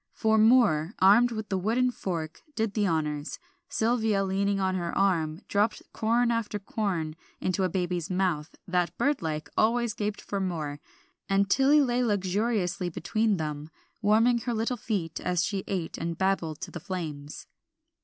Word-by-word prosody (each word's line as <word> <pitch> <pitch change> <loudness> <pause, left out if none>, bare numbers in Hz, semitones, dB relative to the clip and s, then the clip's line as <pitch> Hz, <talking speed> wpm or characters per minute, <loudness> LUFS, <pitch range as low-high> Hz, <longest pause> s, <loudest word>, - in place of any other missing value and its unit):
For 220 0 +2
Moor, 215 -7 +4
armed 210 +6 +6
with 220 -2 -5
the 190 - 0
wooden 240 +6 +1
fork, 165 -8 -4
did 220 -2 -1
the 205 -1 +1
honors; 150 -3 -2 0.3
Sylvia, 220 -3 +1
leaning 195 +1 0
on 190 -1 +1
her 175 -2 -2
arm, 165 -4 +1
dropped 205 +2 +1
corn 235 +2 +2
after 230 -2 -1
corn 190 -6 -2 0.2
into 185 +1 0
a 185 - +2
baby 180 -1 -1
mouth 180 -5 -1
that 180 -1 0
bird 290 0 +1
like 155 -2 -3
always 235 0 +2
gaped 210 -1 -3
for 200 - -4
more; 155 -6 -3 0.5
and 195 0 +2
Tilly 285 +2 +5
lay 250 -2 +1
luxuriously 195 -3 0
between 215 +5 0
them, 150 -1 -4 0.3
warming 225 +3 +4
her 235 0 -2
little 225 +3 0
feet 205 -8 -3
as 180 -1 0
she 195 -1 -2
ate 180 -4 -3
and 165 0 -3
babbled 175 -5 0
to - - -6
the - - -6
flames. 155 -6 -6
195 Hz, 160 wpm, -28 LUFS, 170-220 Hz, 0.5 s, armed